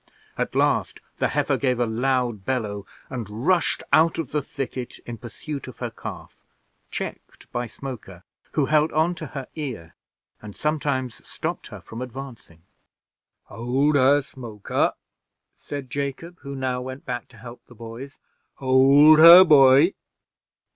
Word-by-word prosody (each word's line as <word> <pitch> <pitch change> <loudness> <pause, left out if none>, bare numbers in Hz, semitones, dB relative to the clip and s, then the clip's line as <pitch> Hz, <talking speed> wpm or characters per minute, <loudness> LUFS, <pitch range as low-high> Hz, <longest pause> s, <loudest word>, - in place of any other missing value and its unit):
At - - -3
last - - +1 0.2
the - - +1
heifer - - 0
gave 125 -3 0
a 120 - +2
loud 120 -2 -1
bellow, 105 -5 -3 0.2
and 115 -2 -6
rushed 180 -2 +1
out 160 +2 +4
of 155 -5 -4
the 150 - 0
thicket 130 -3 -6
in 115 -2 -7
pursuit 135 +5 -7
of 125 -3 -10
her 120 -2 -5
calf, - - -9 0.5
checked - - -8
by 120 0 -3
Smoker, 110 -8 -9 0.3
who 150 - +2
held 155 +2 +2
on 160 +3 +2
to 160 -3 -8
her 135 -1 -7
ear, 125 - -6 0.5
and 105 -2 -10
sometimes 140 -5 -2
stopped - - -5
her - - -10
from 115 +2 -9
advancing. 125 -10 -9 0.8
"Hold 130 +6 0
her, 140 +1 +4
Smoker," 120 -7 -3 0.6
said 140 -3 -8
Jacob, 145 +5 -5
who 140 0 -8
now 130 -1 -2
went 130 +2 -8
back 125 -2 -5
to 115 - -19
help 120 +2 -12
the 120 - -16
boys. 115 +5 -10 0.4
"Hold 140 +4 +6
her, 170 +3 +11
boy. 145 +1 +6
130 Hz, 145 wpm, -23 LUFS, 120-145 Hz, 0.8 s, her